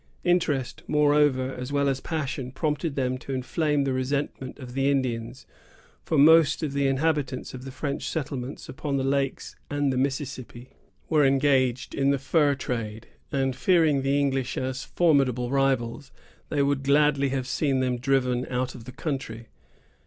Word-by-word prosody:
Interest, 160 -8 0
moreover, 145 -3 +3
as 125 +2 -6
well 140 0 +1
as 135 -1 0
passion, 140 -5 -3
prompted 150 +2 -2
them 130 -1 -1
to 135 - -6
inflame 145 +3 0
the 135 -1 0
resentment 130 0 -3
of 125 -3 -9
the 135 +1 +1
Indians; 125 -3 -2 0.6
for 160 - -1
most 160 +2 +6
of 145 -3 -2
the 140 -1 +1
inhabitants 135 -1 -1
of 130 0 -8
the 135 - -6
French 140 +2 -3
settlements 135 -3 -4
upon 140 -2 -3
the 135 - 0
lakes 135 0 -1
and 145 -2 0
the - - -2
Mississippi 130 -2 -4 0.4
were 155 -2 +3
engaged 135 -2 +2
in 140 0 +1
the 140 - +3
fur 145 +2 +2
trade, 115 -4 -5 0.2
and, 135 -3 0
fearing 160 -2 +3
the 135 +1 +1
English 135 -3 -1
as 130 0 -3
formidable 135 -7 +2
rivals, 135 -1 0 0.4
they 145 -2 +1
would 140 -1 +1
gladly 140 0 +3
have 130 -1 -2
seen 135 -1 0
them 125 -1 0
driven 125 -1 +1
out 125 0 -2
of 115 - -11
the 130 - -8
country. 130 -6 -5
135 Hz, 160 wpm, -26 LUFS, 130-145 Hz, 0.6 s, most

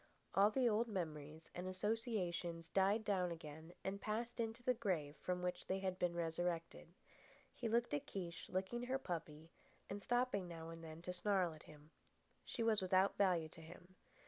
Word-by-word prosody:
All 200 +2 +7
the 250 +2 +3
old 230 +1 +3
memories 155 -6 -4
and 180 +1 -4
associations 185 -5 -1
died 200 +4 +3
down 185 -4 +2
again 160 0 -7
and 200 +1 -2
passed 230 +3 -2
into 230 +1 -1
the 250 - +4
grave 180 -11 0
from 180 0 -1
which 180 0 -2
they 190 - +1
had 190 -1 -1
been 175 -1 +2
resurrected. 170 0 -1 0.7
He 235 - -2
looked 235 -2 +2
at 145 - 0
Kiche 175 -3 -5
licking 190 +6 -1
her 260 +1 +2
puppy 165 - -5 0.4
and 200 +1 -3
stopping 245 -5 +2
now 165 -1 -6
and 165 0 -8
then 160 +1 -8
to 180 - -3
snarl 180 -2 +2
at 155 - -12
him. 150 +1 -14 0.5
She 230 - -2
was 220 -2 +4
without 185 +1 +4
value 175 -5 +3
to 165 - -11
him. 175 +3 -12
185 Hz, 175 wpm, -41 LUFS, 165-210 Hz, 0.7 s, All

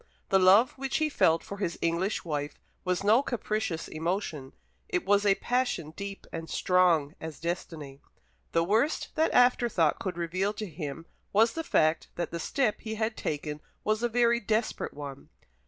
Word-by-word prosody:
The 195 - +5
love 200 +8 +6
which 270 -1 -1
he 310 -1 +1
felt 165 - +3
for 200 - -7
his 175 -4 -2
English 170 +5 -1
wife 145 -2 -3 0.3
was 180 +1 -1
no 220 +5 +5
capricious 215 -9 -2
emotion; 160 -4 -3 0.4
it 180 - -1
was 205 +1 +3
a 195 - +5
passion 245 -12 -1
deep 200 +3 -7
and 165 0 -5
strong 175 -5 +3
as 160 -2 -7
destiny. 155 -4 -5 0.5
The 165 - +2
worst 220 - +1
that 315 +1 +2
afterthought 240 -10 +3
could 185 -3 -4
reveal 185 +4 -1
to 215 0 -5
him 160 -2 -6 0.3
was 225 +3 +4
the 325 - -3
fact 155 - +2
that 175 - -3
the 170 - -4
step 245 - 0
he 220 0 -4
had 220 +1 -1
taken 150 0 -4 0.2
was 215 +1 +1
a 240 - +1
very 235 0 +3
desperate 220 +1 -1
one. 140 -2 -8
185 Hz, 170 wpm, -29 LUFS, 165-220 Hz, 0.5 s, love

